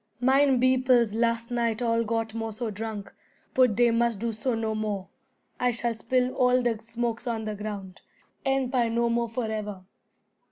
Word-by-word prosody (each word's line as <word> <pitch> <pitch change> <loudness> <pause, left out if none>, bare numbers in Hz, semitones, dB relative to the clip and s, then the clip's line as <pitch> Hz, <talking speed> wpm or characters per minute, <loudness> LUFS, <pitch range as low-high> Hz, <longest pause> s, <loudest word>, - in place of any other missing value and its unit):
"Mine 265 +1 +4
beoples 255 -3 +3
last 230 +1 0
night 235 -2 0
all 230 -1 +1
got 225 0 -2
more 225 -1 -3
so 220 +1 -4
drunk; 210 0 -6 0.4
put 250 -5 +4
dey 240 +1 +4
must 235 -1 +1
do 230 +2 -2
so 230 +3 -1
no 220 -1 -1
more. 210 -3 -3 0.5
I 250 - +3
shall 240 0 -1
spill 250 +3 0
all 250 -1 +3
de 230 -3 0
smokes 235 +1 -3
on 225 -2 -2
the 215 - -2
ground, 200 -3 -6 0.4
and 270 -2 +1
puy 245 -3 +2
no 235 +1 +1
more 235 0 0
forever." 215 -4 -4
230 Hz, 170 wpm, -27 LUFS, 220-245 Hz, 0.5 s, Mine